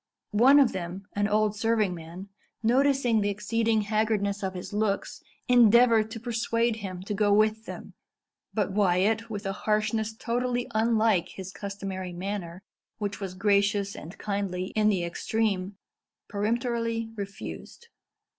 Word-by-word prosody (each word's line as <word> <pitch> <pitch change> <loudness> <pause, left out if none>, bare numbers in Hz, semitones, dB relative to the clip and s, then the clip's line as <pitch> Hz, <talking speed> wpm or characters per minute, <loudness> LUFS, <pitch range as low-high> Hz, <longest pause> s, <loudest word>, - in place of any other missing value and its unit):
One 260 +7 +7
of 265 -5 +5
them, 185 +1 -5
an 205 0 +1
old 210 0 +1
serving 220 -3 +1
man, 170 +4 -9 0.3
noticing 250 -1 +3
the 205 - +1
exceeding 225 +2 0
haggardness 210 -1 0
of 190 -1 -3
his 180 +3 -7
looks, 205 -1 -1 0.3
endeavoured 235 -2 +5
to 225 0 -6
persuade 230 0 0
him 185 -4 -6
to 205 - -4
go 205 0 +2
with 215 +2 +2
them; - - -8 0.6
but 205 -3 -1
Wyat, 205 +3 +2
with 205 -1 -5
a 195 - -1
harshness 215 +2 -1
totally 245 +1 -1
unlike 220 -4 +2
his 190 -1 -8
customary 195 -3 -5
manner, 185 -1 -5 0.3
which 205 -2 -4
was 190 -2 -5
gracious 200 0 +1
and 170 +5 -9
kindly 195 -3 -3
in 215 -1 +4
the 190 -4 +1
extreme, 195 +2 -1 0.5
peremptorily 230 +1 -1
refused. 205 - -8
210 Hz, 135 wpm, -27 LUFS, 195-225 Hz, 0.6 s, One